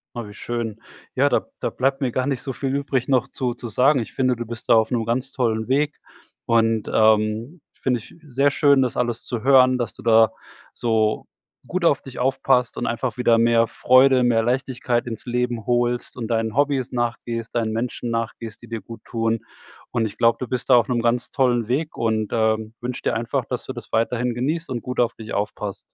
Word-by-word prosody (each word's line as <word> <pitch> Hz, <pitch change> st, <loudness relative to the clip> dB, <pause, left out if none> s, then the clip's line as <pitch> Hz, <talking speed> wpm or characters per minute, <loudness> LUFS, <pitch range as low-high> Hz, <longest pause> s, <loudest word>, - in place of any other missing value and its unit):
Oh, 120 Hz, -3 st, -5 dB
wie 105 Hz, -, -11 dB
schön. 115 Hz, -1 st, -4 dB, 0.3 s
Ja, -, -, +3 dB
da -, -, 0 dB
da -, -, 0 dB
bleibt 135 Hz, +2 st, 0 dB
mir 130 Hz, -3 st, 0 dB
gar 130 Hz, +2 st, -1 dB
nicht 135 Hz, -3 st, -1 dB
so 135 Hz, -, -4 dB
viel 135 Hz, +1 st, -2 dB
übrig 140 Hz, -3 st, -1 dB
noch 130 Hz, -4 st, +2 dB
zu 125 Hz, -2 st, -2 dB
zu 120 Hz, 0 st, -8 dB
sagen. 130 Hz, +6 st, +3 dB
Ich 115 Hz, -, -7 dB
finde, 130 Hz, -1 st, +1 dB
du 120 Hz, 0 st, -5 dB
bist 115 Hz, 0 st, -8 dB
da -, -, +7 dB
auf 110 Hz, -1 st, +3 dB
‘nem 115 Hz, -2 st, 0 dB
ganz 125 Hz, +4 st, -1 dB
tollen 115 Hz, -3 st, -1 dB
Weg 145 Hz, +2 st, +1 dB, 0.5 s
und, 115 Hz, -1 st, +2 dB
ähm, 110 Hz, +7 st, +2 dB
finde 125 Hz, -2 st, -1 dB
ich -, -, -14 dB
sehr 140 Hz, +1 st, +2 dB
schön, 140 Hz, -1 st, +4 dB
das 125 Hz, -2 st, -1 dB
alles 120 Hz, -1 st, -1 dB
zu 120 Hz, -3 st, -3 dB
hören, 130 Hz, -1 st, +5 dB
dass 120 Hz, -2 st, -3 dB
du -, -, -12 dB
da 115 Hz, -1 st, +5 dB, 0.4 s
so 110 Hz, -2 st, 0 dB, 0.4 s
gut 185 Hz, 0 st, -3 dB
auf 145 Hz, -5 st, +3 dB
dich 130 Hz, -2 st, -10 dB
aufpasst 130 Hz, -1 st, +1 dB
und 120 Hz, -, -2 dB
einfach 120 Hz, +1 st, -2 dB
wieder 120 Hz, -2 st, +4 dB
mehr 115 Hz, 0 st, +4 dB
Freude, 130 Hz, +3 st, +4 dB
mehr 115 Hz, -2 st, +3 dB
Leichtigkeit 125 Hz, -1 st, -1 dB
ins 115 Hz, -2 st, -5 dB
Leben 120 Hz, -2 st, -2 dB
holst 120 Hz, 0 st, 0 dB
und 115 Hz, -2 st, -4 dB
deinen 115 Hz, -1 st, -1 dB
Hobbys 140 Hz, -3 st, +1 dB
nachgehst, 120 Hz, -1 st, -3 dB
deinen 115 Hz, -2 st, 0 dB
Menschen 120 Hz, +1 st, -3 dB
nachgehst, 115 Hz, -1 st, -4 dB
die 120 Hz, -, -12 dB
dir 115 Hz, -2 st, -5 dB
gut 115 Hz, +3 st, -11 dB
tun. 115 Hz, 0 st, -1 dB, 0.5 s
Und, 120 Hz, -2 st, 0 dB
ich 105 Hz, -1 st, -6 dB
glaube, 115 Hz, 0 st, +3 dB
du 130 Hz, -, -3 dB
bist 125 Hz, +2 st, -3 dB
da 130 Hz, -, +8 dB
auf 120 Hz, 0 st, +3 dB
‘nem 120 Hz, -2 st, +1 dB
ganz 120 Hz, +1 st, 0 dB
tollen 120 Hz, -4 st, +1 dB
Weg 150 Hz, +5 st, -1 dB
und, 110 Hz, -2 st, -1 dB
ähm, 110 Hz, -1 st, 0 dB
wünsche 125 Hz, +1 st, -4 dB
dir -, -, +1 dB
einfach, 115 Hz, +3 st, -1 dB
dass 125 Hz, -, -4 dB
du -, -, -5 dB
das 120 Hz, -3 st, -9 dB
weiterhin 120 Hz, +2 st, +1 dB
genießt 155 Hz, +7 st, -2 dB
und 125 Hz, -2 st, -3 dB
gut 125 Hz, -1 st, -5 dB
auf 120 Hz, -1 st, +2 dB
dich 110 Hz, -1 st, -10 dB
aufpasst. 105 Hz, 0 st, -3 dB
120 Hz, 215 wpm, -22 LUFS, 115-130 Hz, 0.5 s, da